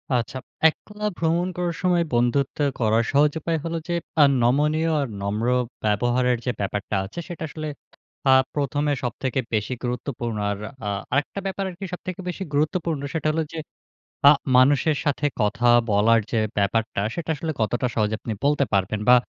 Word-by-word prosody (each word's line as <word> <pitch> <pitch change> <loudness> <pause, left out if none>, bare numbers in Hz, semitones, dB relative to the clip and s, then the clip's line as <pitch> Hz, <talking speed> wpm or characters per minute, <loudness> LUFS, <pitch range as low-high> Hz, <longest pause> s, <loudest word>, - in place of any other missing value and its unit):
আচ্ছা। 120 +2 -2 0.3
একলা 210 +6 -8
ভ্রমণ 170 +2 +1
করার 175 -1 -1
সময় 180 -2 +3
বন্ধুত্ব 120 +3 +1 0.2
করার 110 0 +3
সহজ 145 +1 +4
উপায় 165 +1 -1
হল 165 - -3
যে 175 - -1 0.3
আ - - +9 0.2
নমনীয় 150 +6 +2
আর 140 - -1
নম্র 105 +4 -1 0.4
ব্যবহারের 120 +4 +2
যে 125 - +1
ব্যাপারটা 100 +1 -2
আছে 140 - -8
সেটা 175 -3 -6
আসলে 155 0 -5 0.6
আ - - +8 0.2
প্রথমে 145 +1 0
সবথেকে 130 +2 -2
বেশি 110 +3 0
গুরুত্বপূর্ণ। 120 -2 -3
আর 100 - -3 0.3
আ - - 0 0.2
আরেকটা 145 +8 0
ব্যাপার 195 0 -2
আরকি 190 +2 -7
সবথেকে 185 0 -6
বেশি 185 +2 -4
গুরুত্বপূর্ণ 155 0 0
সেটা 160 -2 -1
হলো 160 +1 0
যে 165 - -4 0.7
আ - - +11 0.3
মানুষের 145 +4 +4
সাথে 145 0 +1 0.2
কথা 115 +4 +1 0.2
বলার 110 +3 +4
যে 115 - +2 0.2
ব্যাপারটা 110 +2 0
সেটা 170 -1 -4
আসলে 160 +3 -3
কতটা 120 +4 +1
সহজে 110 -1 +1
আপনি 115 - -4
বলতে 145 0 +3
পারবেন 100 +1 +1
বা 125 - +9
140 Hz, 160 wpm, -24 LUFS, 115-160 Hz, 0.7 s, আ